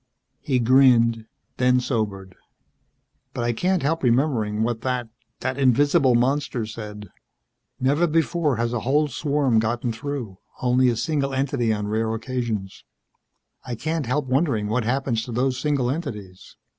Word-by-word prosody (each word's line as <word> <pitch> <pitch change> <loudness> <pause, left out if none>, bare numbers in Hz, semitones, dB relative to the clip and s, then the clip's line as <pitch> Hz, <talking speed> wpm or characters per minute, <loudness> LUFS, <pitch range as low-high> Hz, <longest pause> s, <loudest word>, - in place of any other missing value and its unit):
He 130 - 0
grinned, 115 -2 +4 0.3
then 125 0 +3
sobered. 100 -6 -3 1.0
"But - - -2
I 120 0 0
can't 180 +7 0
help 165 +3 0
remembering 115 -4 +1
what 115 -1 -2
that 125 -2 -2 0.3
that 130 +1 -2
invisible 135 0 +4
monster 130 -1 0
said: 105 -2 -8 0.7
'Never 145 +7 +2
before 160 -2 +1
has 115 +1 -1
a 120 - 0
whole 145 +6 +1
swarm 140 -3 +1
gotten 120 +2 -1
through. 120 -6 -5 0.2
Only 125 0 +3
a 120 - 0
single 140 0 -1
entity 130 -4 0
on 105 -1 -2
rare 110 +1 -1
occasions.' 115 -5 -4 0.8
"I 125 - -5
can't 155 +1 -3
help 145 +3 0
wondering 130 -6 0
what 115 +1 0
happens 125 -2 0
to 125 - -7
those 130 +2 0
single 140 -5 0
entities. 105 - -7
125 Hz, 145 wpm, -23 LUFS, 115-140 Hz, 1.0 s, grinned